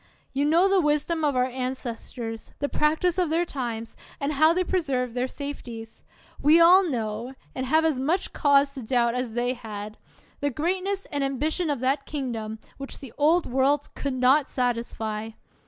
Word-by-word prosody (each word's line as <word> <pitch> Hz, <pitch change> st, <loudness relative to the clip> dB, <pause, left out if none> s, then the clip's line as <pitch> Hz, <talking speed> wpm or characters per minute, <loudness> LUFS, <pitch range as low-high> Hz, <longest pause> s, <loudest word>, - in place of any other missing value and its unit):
You 280 Hz, +2 st, +1 dB
know 335 Hz, +5 st, +4 dB
the 390 Hz, -1 st, +4 dB
wisdom 300 Hz, +2 st, 0 dB
of 290 Hz, -3 st, +2 dB
our 250 Hz, -, +3 dB
ancestors, 245 Hz, -3 st, -5 dB
the 285 Hz, -, -1 dB
practise 320 Hz, +5 st, +1 dB
of 355 Hz, -3 st, +2 dB
their 335 Hz, +2 st, +1 dB
times; 235 Hz, -7 st, -5 dB, 0.2 s
and 285 Hz, +1 st, -1 dB
how 310 Hz, +3 st, +5 dB
they 365 Hz, +2 st, +1 dB
preserved 275 Hz, -10 st, -1 dB
their 250 Hz, +1 st, -1 dB
safeties! 245 Hz, -6 st, -7 dB, 0.4 s
We 305 Hz, +4 st, +6 dB
all 355 Hz, +3 st, +8 dB
know, 245 Hz, -, -3 dB, 0.2 s
and 260 Hz, 0 st, -3 dB
have 315 Hz, +4 st, +3 dB
as 305 Hz, -5 st, +1 dB
much 330 Hz, +8 st, 0 dB
cause 280 Hz, -1 st, +3 dB
to 270 Hz, -, -6 dB
doubt 235 Hz, 0 st, +1 dB
as 250 Hz, -2 st, -3 dB
they 245 Hz, +1 st, 0 dB
had, 215 Hz, -3 st, -8 dB, 0.4 s
the 285 Hz, -, 0 dB
greatness 375 Hz, +7 st, -1 dB
and 285 Hz, -2 st, -1 dB
ambition 300 Hz, +5 st, -1 dB
of 280 Hz, -4 st, -1 dB
that 275 Hz, +2 st, 0 dB
kingdom, 230 Hz, -7 st, -4 dB, 0.2 s
which 275 Hz, -, -6 dB
the 270 Hz, -5 st, -11 dB
Old 320 Hz, +4 st, +4 dB
World 270 Hz, +3 st, +1 dB
could 280 Hz, -2 st, -3 dB
not 260 Hz, +3 st, +4 dB
satisfy! 225 Hz, -3 st, -2 dB
275 Hz, 170 wpm, -26 LUFS, 245-310 Hz, 0.4 s, all